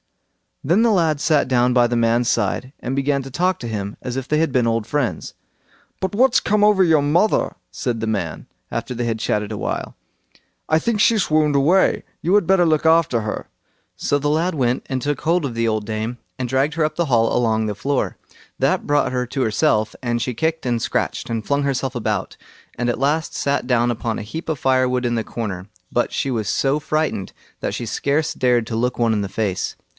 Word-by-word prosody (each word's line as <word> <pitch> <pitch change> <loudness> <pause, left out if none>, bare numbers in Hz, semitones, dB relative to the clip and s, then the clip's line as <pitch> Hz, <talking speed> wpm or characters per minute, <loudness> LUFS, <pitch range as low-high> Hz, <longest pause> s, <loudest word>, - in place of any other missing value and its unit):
Then 175 +10 +3
the 235 - +4
lad 165 -7 +2
sat 150 -2 +2
down 125 -1 +2
by 120 -1 +5
the 120 - -1
man's 115 +1 +2
side, 115 +4 -1
and 130 +2 -3
began 140 0 0
to 135 - -9
talk 180 +7 +1
to 120 - -5
him 105 -2 -4
as 125 -1 -4
if 135 0 -4
they 150 - +1
had 160 -2 +1
been 125 -2 +2
old 115 -1 0
friends. 140 -1 -2 0.7
"But 190 0 -2
what's 250 +4 +4
come 210 0 +1
over 210 -2 +5
your 160 -4 +4
mother?" 170 +9 +2 0.2
said 120 -4 -3
the 110 - -2
man, 100 -7 -3 0.2
after - - -3
they 120 0 -2
had 115 -1 -1
chattered 105 0 -1
a 105 - -4
while. - - -4 0.7
"I 155 - +4
think 215 +6 0
she 225 +2 +4
swooned 155 -6 +2
away; 160 +8 +3 0.2
you 175 - +1
had 205 -4 +4
better 190 -1 +4
look 155 -1 +2
after 160 -7 +4
her." 105 0 -4 0.5
So 145 - 0
the 145 +1 0
lad 165 +5 +1
went 125 -4 0
and 130 -2 -2
took 145 +1 -2
hold 165 0 +1
of 125 -4 -4
the 115 0 +1
old 110 -1 -1
dame; 110 +2 -3 0.2
and 125 -2 -3
dragged 135 +4 +1
her 160 -2 +2
up 155 - -3
the 170 - 0
hall 115 -5 +2
along 110 -2 +1
the 105 -1 -2
floor. 140 +6 -1 0.4
That - - +1
brought 145 -2 +2
her 125 -1 -1
to 135 - -3
herself, 110 -1 +1
and 120 -2 -1
she 125 0 -2
kicked, 160 +5 -1
and 120 -2 0
scratched, 120 0 -2
and 115 -2 -3
flung 140 0 +1
herself 135 -1 -1
about, 105 -4 -2 0.4
and 120 - -1
at 120 - -1
last 150 +3 0
sat 140 -2 0
down 120 -1 +2
upon 115 -1 -2
a - - -5
heap 160 +11 -7
of 155 -4 -2
firewood 130 -1 +2
in 120 0 0
the 115 - -1
corner; 100 -6 -5 0.2
but 120 - 0
she 135 - -1
was 110 -5 -1
so 140 +2 +1
frightened 155 -9 -2 0.3
that - - -2
she 120 - -4
scarce 145 +7 0
dared 120 -3 +2
to 115 - -3
look 125 +2 -1
one 115 -1 +3
in 105 - 0
the 100 - -3
face. 100 -4 -2
130 Hz, 220 wpm, -21 LUFS, 115-155 Hz, 0.7 s, by